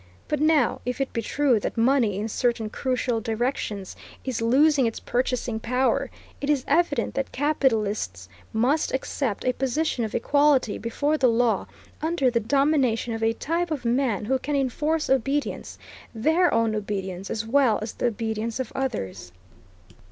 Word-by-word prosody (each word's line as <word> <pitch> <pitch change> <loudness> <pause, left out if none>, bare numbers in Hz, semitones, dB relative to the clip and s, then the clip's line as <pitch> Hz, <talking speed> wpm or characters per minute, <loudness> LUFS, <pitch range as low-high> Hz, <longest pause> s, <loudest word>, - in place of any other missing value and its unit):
But 300 -1 -1
now, 305 -5 +3
if 250 +1 -3
it 270 - -2
be 230 - -1
true 265 0 +2
that - - -4
money, 230 -4 +3
in 210 +2 -2
certain 230 -1 -1
crucial 250 -3 -1
directions, 220 -3 -2 0.3
is 255 -4 -2
losing 270 +3 +4
its 225 - -4
purchasing 245 -2 -1
power, 250 +3 0 0.3
it 285 - -2
is 280 -4 +1
evident 315 0 +1
that 275 -1 -2
capitalists 215 - 0 0.2
must 255 +8 +1
accept 265 -4 -2
a 255 - +2
position 270 0 -1
of 220 - -3
equality 285 -3 +2
before 290 +7 -1
the 255 - +4
law 235 0 +1 0.3
under 315 -5 +1
the 235 - +2
domination 260 -2 +1
of 225 - -4
a 225 0 +2
type 335 +7 -2
of 290 -6 -4
man 235 -4 +1
who 265 +4 +1
can 290 +3 -2
enforce 300 +4 0
obedience; 275 +2 -1 0.4
their 320 +10 +3
own 225 -1 +2
obedience, 195 -3 -4
as 225 0 -3
well 240 -2 +3
as 215 - -5
the - - 0
obedience 225 +1 -3
of 260 - -3
others. 215 - -4
250 Hz, 160 wpm, -25 LUFS, 225-280 Hz, 0.4 s, losing